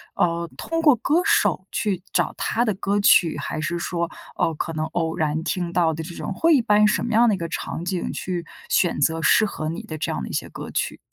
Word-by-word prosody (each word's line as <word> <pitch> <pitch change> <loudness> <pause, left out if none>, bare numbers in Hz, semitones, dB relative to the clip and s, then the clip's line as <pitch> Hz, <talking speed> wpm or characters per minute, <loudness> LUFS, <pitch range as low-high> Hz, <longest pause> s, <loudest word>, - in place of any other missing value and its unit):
呃， 170 -1 0
通 330 0 -2
过 300 -5 +6
歌 295 +9 +1
手 420 +1 +2
去 195 -5 -1
找 - - +1
他 240 - 0
的 215 - +1
歌 200 +2 -1
曲， 170 -6 +5
还 145 +2 -4
是 170 +2 -2
说， 170 -1 -2 0.3
呃， 165 - +1
可 165 +2 -4
能 155 0 -2
偶 160 0 -2
然 155 0 -1
听 175 0 -2
到 165 -3 +2
的 160 +1 -5
这 170 +2 -8
种， - - -4
会 330 0 +3
一 265 - +4
般 210 -2 +4
什 - - +1
么 235 - -2
样 235 +2 +5
的 210 - +2
一 - - -6
个 170 - -4
场 170 - -4
景 180 -1 -2
去 175 -2 -4 0.2
选 175 -5 +2
择 160 +3 +1
适 215 - +5
合 155 -6 -4
你 165 - -5
的 155 - -7
这 - - -2
样 - - -3
的 65 - -5
一 - - -7
些 - - -2
歌 - - -8
曲？ - - -2
175 Hz, 265 characters per minute, -23 LUFS, 160-210 Hz, 0.3 s, 过